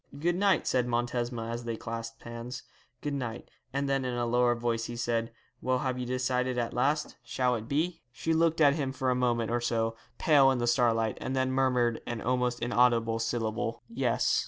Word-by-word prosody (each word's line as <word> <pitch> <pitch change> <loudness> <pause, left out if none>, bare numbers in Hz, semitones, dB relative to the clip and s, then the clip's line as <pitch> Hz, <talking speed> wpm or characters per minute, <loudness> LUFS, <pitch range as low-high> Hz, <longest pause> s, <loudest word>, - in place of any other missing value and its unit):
'Good 170 +4 +1
night,' 195 0 +3
said 125 -1 +1
Montesma, 120 -1 -1
as 120 +1 -4
they 115 -1 -3
clasped 115 0 -6
hands; 115 +1 -7 0.4
'good 145 - -2
night;' 120 -4 -4 0.2
and 140 +1 -1
then 135 -1 +1
in 125 -1 -2
a 120 0 0
lower 120 +1 +3
voice 115 -1 -1
he 120 - -5
said, 115 -1 -1 0.3
'Well, 130 0 +1
have 130 0 -2
you 125 - -3
decided 125 0 0
at 120 -1 -1
last? 145 +5 0
Shall 125 +1 0
it 110 -1 -5
be?' 165 +5 0
She 160 +7 -1
looked 165 0 +2
at 145 -2 +7
him 140 -3 -2
for 130 -1 0
a - - +2
moment 120 -2 +1
or 120 0 +1
so, 115 -1 0 0.2
pale 140 -4 +5
in 130 - +2
the 120 - 0
starlight, 115 -2 +2
and 130 - -2
then 130 0 +1
murmured 125 -3 +2
an 120 -1 -3
almost 125 +1 0
inaudible 120 -2 +3
syllable. 115 0 -2
'Yes.' 230 - +1
125 Hz, 200 wpm, -29 LUFS, 115-130 Hz, 0.4 s, at